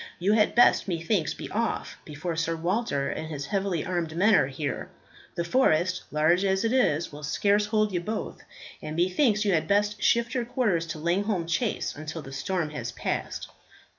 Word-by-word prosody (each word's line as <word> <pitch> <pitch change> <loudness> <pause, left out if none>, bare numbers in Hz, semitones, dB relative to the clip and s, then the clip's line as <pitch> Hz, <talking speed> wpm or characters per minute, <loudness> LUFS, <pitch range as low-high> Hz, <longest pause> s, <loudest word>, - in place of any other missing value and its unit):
You 195 +4 +2
had 210 -1 +3
best, 240 - +5
methinks, 170 -1 0
be - - -7
off 230 +2 -2
before 160 +3 -4
Sir 165 0 -1
Walter 170 -4 -1
and 160 - -5
his 145 -3 -5
heavily 190 -1 -1
armed 170 -3 -2
men 205 +4 +4
are 160 - +5
here. 135 0 -4 0.5
The 170 - -1
forest, 180 -4 +2
large 155 +5 +2
as 190 0 +1
it 225 - +1
is, 170 - +2
will 145 0 -9
scarce 200 +8 +1
hold 215 -1 +1
you 180 - 0
both, 215 +5 -4 0.4
and 155 - -5
methinks 210 - +2
you 200 - +2
had 160 - +1
best 205 +1 +1
shift 235 +2 +2
your 250 -2 0
quarters 210 -9 0
to 165 - -5
Langholm 180 +3 0
Chase 215 +7 -1
until 155 +1 -6
the 135 - -10
storm 165 +2 -2
has 125 -5 -5
passed." - - -4
180 Hz, 185 wpm, -27 LUFS, 155-210 Hz, 0.5 s, best